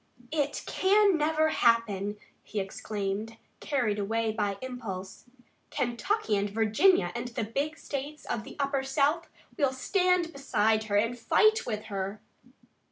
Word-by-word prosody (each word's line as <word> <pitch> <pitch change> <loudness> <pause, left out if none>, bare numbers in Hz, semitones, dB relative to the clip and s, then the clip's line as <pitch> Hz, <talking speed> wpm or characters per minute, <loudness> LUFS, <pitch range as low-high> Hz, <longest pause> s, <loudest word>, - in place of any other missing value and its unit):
"It 290 -2 -1
can 400 0 +4
never 315 0 +2
happen!" 210 -6 +2 0.2
he 210 - -4
exclaimed, 200 +2 -4 0.2
carried 240 -8 0
away 225 +2 0
by 205 -2 -1
impulse. 225 -8 -7 0.4
"Kentucky 245 - 0
and 200 0 0
Virginia 220 - +3
and 240 +1 -4
the 240 -1 -3
big 280 +8 -2
states 290 +2 -6
of 220 - -3
the - - -11
Upper 275 -1 +1
South 285 +5 +1 0.3
will 280 -3 +3
stand 360 +4 +1
beside 220 -5 +1
her 205 -2 -1
and 230 +3 0
fight 435 - +3
with 215 -2 -2
her!" 195 +2 -3
235 Hz, 135 wpm, -29 LUFS, 210-300 Hz, 0.4 s, can